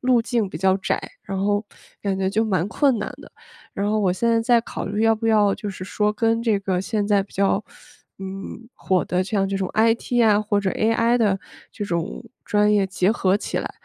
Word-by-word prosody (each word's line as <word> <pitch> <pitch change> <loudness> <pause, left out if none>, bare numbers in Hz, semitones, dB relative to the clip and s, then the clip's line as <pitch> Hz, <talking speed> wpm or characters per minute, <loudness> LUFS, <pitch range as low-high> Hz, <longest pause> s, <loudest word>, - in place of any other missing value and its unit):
路 250 -2 +3
径 225 -4 -1
比 - - -7
较 190 0 +2
窄， 190 - -1 0.3
然 195 - -4
后 205 +2 0 0.3
感 195 -2 -1
觉 190 0 0
就 220 +2 +1
蛮 185 -5 0
困 270 +1 +2
难 210 - -3
的。 - - -14 0.4
然 200 +1 -1
后 215 - +1
我 190 -3 +2
现 235 +5 -2
在 230 0 +3
在 235 0 +3
考 - - -6
虑 205 +2 -1
要 225 0 +4
不 225 +1 -3
要 210 -2 +4
就 210 - -6
是 190 -2 -7
说， 210 +2 0
跟 225 +1 +1
这 220 -4 +2
个 185 -2 -1
现 205 +2 -2
在 205 -2 +3
比 195 - -17
较， 200 +1 +1 0.6
嗯， 195 +4 -7
火 185 -2 0
的， 180 +1 0
像 195 0 0
这 195 0 -2
种 190 -1 -2
IT 230 +2 +2
啊， 210 -1 +4
或 210 -1 0
者 195 -2 0
AI 230 +2 +2
的 205 -4 +2 0.3
这 205 - -5
种 170 +5 -3 0.2
专 210 0 +3
业 205 -2 +3
结 190 +1 +1
合 190 -4 +2
起 - - -3
来， - - -4
205 Hz, 245 characters per minute, -22 LUFS, 195-225 Hz, 0.6 s, 要